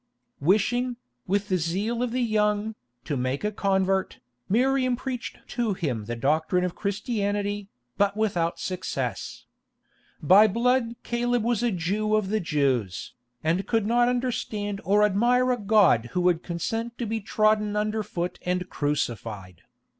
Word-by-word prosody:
Wishing, 240 - +1 0.3
with 200 +2 0
the 185 - +1
zeal 200 +9 -1
of 250 - 0
the 250 +2 0
young, 210 -1 +1 0.3
to 145 - -2
make 130 +4 -2
a 210 - 0
convert, 190 -2 0 0.3
Miriam 255 +3 +2
preached 250 0 -5
to 235 -5 -1
him 130 - -2
the 120 +2 -4
doctrine 155 +8 +1
of 180 -1 -1
Christianity, 205 -1 -2 0.3
but 205 0 +2
without 180 -6 0
success. 140 - -4 0.7
By 195 +8 +7
blood 235 +2 +1
Caleb 240 -1 0
was 235 -1 +1
a 240 - +2
Jew 210 +3 0
of 210 -3 0
the 215 +1 +1
Jews, 135 - -1 0.3
and 170 +5 0
could 225 -3 +1
not 240 +2 +3
understand 215 -5 -2
or 205 +5 +3
admire 240 +5 +3
a 250 - +1
God 195 - +4
who 180 - +1
would 175 -2 +2
consent 225 +8 -3
to 240 - -2
be 225 0 -2
trodden 210 +1 +2
under 215 +1 0
foot 180 -4 -4
and 180 0 -1
crucified. 110 - -3
205 Hz, 145 wpm, -26 LUFS, 175-230 Hz, 0.7 s, By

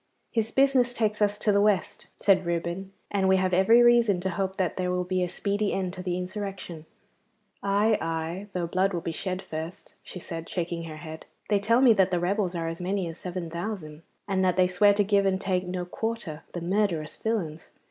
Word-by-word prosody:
'His 225 -1 0
business 265 -2 +3
takes 215 -2 0
us 205 0 +2
to 210 - +1
the 200 0 +4
West,' 205 -3 0
said 190 -2 +3
Reuben, 170 +2 -3 0.2
'and 195 -2 +1
we 190 - +5
have 185 -1 0
every 225 +6 +6
reason 235 -5 +5
to 190 +1 -1
hope 190 +1 -2
that 185 -5 -1
there 180 -1 -1
will 180 0 0
be 185 0 -1
a 180 - 0
speedy 205 +3 -1
end 185 -2 -2
to 185 - -6
the 180 -1 -2
insurrection.' 185 -4 -6 0.7
'Aye, 205 +2 +2
aye, 165 +4 -3
though 180 -2 -1
blood 185 +3 +1
will 170 - -2
be 165 - -3
shed 185 +3 -4
first,' 160 +3 -7
she - - -10
said, 165 -1 -7
shaking 170 -1 -3
her 155 -1 -8
head. 160 0 -9 0.2
'They 205 -1 +3
tell 230 +5 +3
me 250 -4 +7
that 190 -3 +3
the 180 -2 0
rebels 185 +1 0
are 165 -1 -2
as 165 +1 -5
many 190 0 -1
as 165 - -9
seven 180 -1 -5
thousand, 170 -3 -5 0.3
and 190 -2 +1
that 185 -1 +2
they 185 - +5
swear 200 +3 +4
to 205 - +3
give 200 0 +3
an' 190 -1 +2
take 185 -1 -1
no 180 0 -3
quarter, 200 -5 -4
the 175 - -4
murderous 175 -4 0
villains! 175 -9 -3
185 Hz, 215 wpm, -27 LUFS, 175-205 Hz, 0.7 s, me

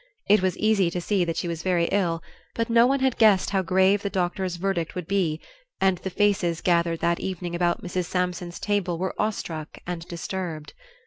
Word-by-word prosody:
It 210 0 +5
was 185 -1 0
easy 210 -4 +3
to 180 - -3
see 190 +1 +1
that 165 -1 -3
she - - -2
was 170 -1 -3
very 175 -2 +1
ill, 170 -5 0 0.3
but 230 0 -1
no 235 +1 +6
one 275 +1 +1
had 265 -2 +1
guessed 210 -5 +5
how 195 -1 +2
grave 190 +2 +3
the 200 - -2
doctor's 185 -1 -1
verdict 175 -2 -2
would 180 -3 -5
be, 175 -6 0 0.4
and 190 -2 +2
the 190 - -4
faces 190 -4 +1
gathered 170 -2 +1
that 170 0 +1
evening 180 -2 -4
about 175 0 0
Mrs. 180 0 -2
Sampson's 180 -1 -2
table 200 -5 0
were 185 +2 -2
awestruck 165 -7 -3
and 175 -1 -5
disturbed. 170 -3 -5
180 Hz, 195 wpm, -25 LUFS, 170-195 Hz, 0.4 s, no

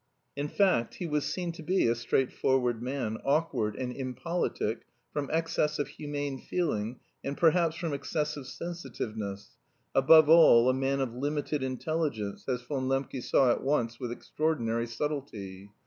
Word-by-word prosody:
In 145 +1 -2
fact, 185 - +2
he 180 - -5
was 150 -3 0
seen 175 +3 -2
to 165 - -10
be 185 +4 +2
a 115 - +4
straightforward 125 0 +1
man, 125 -4 -3
awkward 135 -8 +1
and 125 -1 -4
impolitic 130 -3 -2 0.3
from 145 -2 -2
excess 155 -1 0
of 145 - -2
humane 145 -2 -4
feeling 125 -10 -2 0.2
and 140 +1 -3
perhaps 165 -1 +3
from 165 -2 -3
excessive 145 0 -3
sensitiveness 110 - -5 0.4
above 155 +3 +7
all, 155 -7 +7
a - - -1
man 135 +1 0
of 125 -3 -2
limited 145 +3 -2
intelligence, 130 -5 -2
as 125 -1 -1
Von 130 0 -2
Lembke 135 -1 -1
saw 125 +1 +4
at - - 0
once 120 -4 0
with 125 -2 -4
extraordinary 120 -4 -1
subtlety. 115 -8 -5
135 Hz, 150 wpm, -29 LUFS, 120-155 Hz, 0.4 s, above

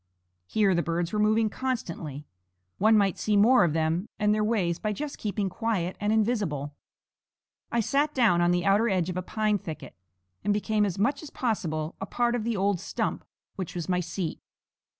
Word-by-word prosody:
Here 200 - +2
the 170 - +2
birds 170 +1 -2
were 210 - 0
moving 215 +1 +3
constantly; 170 - -4 0.5
one 220 +2 +5
might 200 -3 +2
see 210 -1 +1
more 230 +2 +6
of 165 -4 +1
them 165 +5 0
and 210 0 +2
their 215 0 +1
ways 190 -6 0
by 215 -1 -1
just 290 +6 -5
keeping 205 -1 -1
quiet 190 -2 -2
and 205 0 0
invisible. 205 - 0 1.0
I 235 - +2
sat 285 +6 +1
down 220 -10 +4
on 175 - +3
the 175 0 +1
outer 205 +4 +4
edge 185 -2 0
of 180 - -5
a - - 0
pine 210 +2 0
thicket, 160 -3 -8 0.5
and 205 - +2
became 210 0 +1
as 185 - -4
much 265 +8 +1
as 310 - -9
possible 165 -10 -2
a 195 - -3
part 240 +2 +1
of 240 -3 -1
the 230 -1 -1
old 195 -1 +1
stump - - -3 0.3
which 185 -3 -5
was 170 -2 -3
my 180 -1 +1
seat. 175 -1 -4
205 Hz, 190 wpm, -27 LUFS, 175-220 Hz, 1.0 s, more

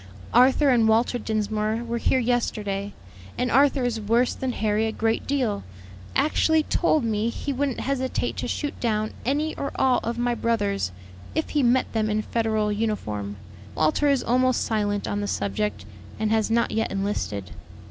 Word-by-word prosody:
"Arthur 265 +4 +5
and 235 -4 +4
Walter 230 +2 +2
Dinsmore 215 +1 -1
were 235 0 -3
here 260 - +2
yesterday, 210 -5 -1 0.4
and 250 - 0
Arthur 275 0 +4
is 235 -3 -1
worse 230 +4 +2
than 260 -1 -3
Harry 215 -1 0
a - - -1
great 225 +1 -1
deal; 250 -8 0 0.5
actually 310 +2 +3
told 310 -3 +1
me 220 0 0
he 280 +4 -3
wouldn't 275 -1 -1
hesitate 260 -1 -1
to - - -2
shoot 290 -2 -3
down 215 -2 -1
any 300 +4 0
or 280 - -3
all 260 -2 +3
of 235 +1 -4
my 240 0 +1
brothers, 205 - 0 0.4
if 315 - -1
he 295 - +1
met 255 0 +2
them 215 -1 0
in 215 0 0
Federal 220 -2 0
uniform. 110 - -2 0.4
Walter 155 - +2
is 280 -2 +2
almost 255 +1 +2
silent 205 -2 -1
on 205 - -2
the 205 - -2
subject, 100 - -2 0.3
and 220 0 0
has 220 -1 +2
not 235 +1 +2
yet 225 +1 0
enlisted. 105 - -3
225 Hz, 170 wpm, -25 LUFS, 210-255 Hz, 0.5 s, Arthur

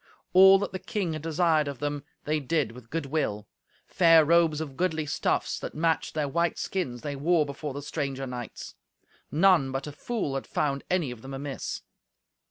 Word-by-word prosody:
All 190 +1 +9
that 200 0 -3
the 185 - -4
king 185 -2 -2
had 155 - -5
desired 160 -1 +2
of 140 -2 -4
them 145 +1 -3 0.2
they 155 +1 0
did 145 -3 0
with 120 -1 -13
good 165 0 -2
will. 105 -8 -2 0.4
Fair 165 -3 +5
robes 165 -1 +4
of 150 -4 -5
goodly 160 -3 0
stuffs 145 - -1
that - - -6
matched 160 0 0
their 150 -2 0
white 170 +4 0
skins 130 -11 -3
they 145 -1 -3
wore 155 +2 +2
before 140 0 -6
the 145 - -5
stranger 140 -2 -3
knights. 125 -3 -7 0.6
None 165 -4 +4
but 135 +1 -3
a 150 - -6
fool 150 - -3
had 135 - -4
found 140 -2 -1
any 175 -8 +1
of 120 -2 -9
them 135 +2 -7
amiss. 140 0 -5
150 Hz, 185 wpm, -27 LUFS, 135-170 Hz, 0.6 s, All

